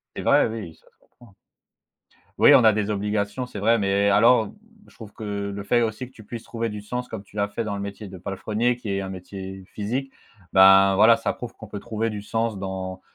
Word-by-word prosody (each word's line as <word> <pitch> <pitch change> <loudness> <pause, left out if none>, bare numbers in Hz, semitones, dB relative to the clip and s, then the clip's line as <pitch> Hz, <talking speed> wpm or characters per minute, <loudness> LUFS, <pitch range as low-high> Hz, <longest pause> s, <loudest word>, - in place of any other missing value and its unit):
C'est - - -4
vrai, - - +4
oui, 110 -8 -7
ça - - -29
se - - -41
comprend, 120 - -21
hein. - - -27 1.0
Oui, - - +8
on - - +7
a 110 - +7
des 105 0 -1
obligations, 105 +4 -2
c'est 115 - -9
vrai. 115 +3 +3
Mais 100 0 +2
alors, 115 +2 +5
mmh, - - -14 0.4
je - - -22
trouve 110 -3 -11
que 110 - -11
le 100 -1 -4
fait 120 +4 +2
aussi 115 +2 -2
que 125 - -16
tu 110 - -15
puisses 115 +2 -8
trouver 115 -1 -4
du 105 -1 -6
sens 125 +4 -5
comme 110 -4 -7
tu 105 - -23
l'as 100 -1 0
fait 105 +3 -4
dans 110 -2 -4
le 100 - -5
métier 100 +1 -7
de 95 0 -10
palefrenier 105 +6 -1
qui 115 -4 -7
est 100 0 -1
un 95 - -5
métier 95 +1 -8
physique. 125 +6 -3 0.4
Ben, 95 0 +7
voilà, 110 +3 +6
ça 115 - -2
prouve 120 -2 -8
qu'on 110 - -11
peut 100 0 -7
trouver 110 +2 -3
du 105 -1 -5
sens 110 -1 -2
dans 95 -1 -5
105 Hz, 240 wpm, -24 LUFS, 100-115 Hz, 1.0 s, Oui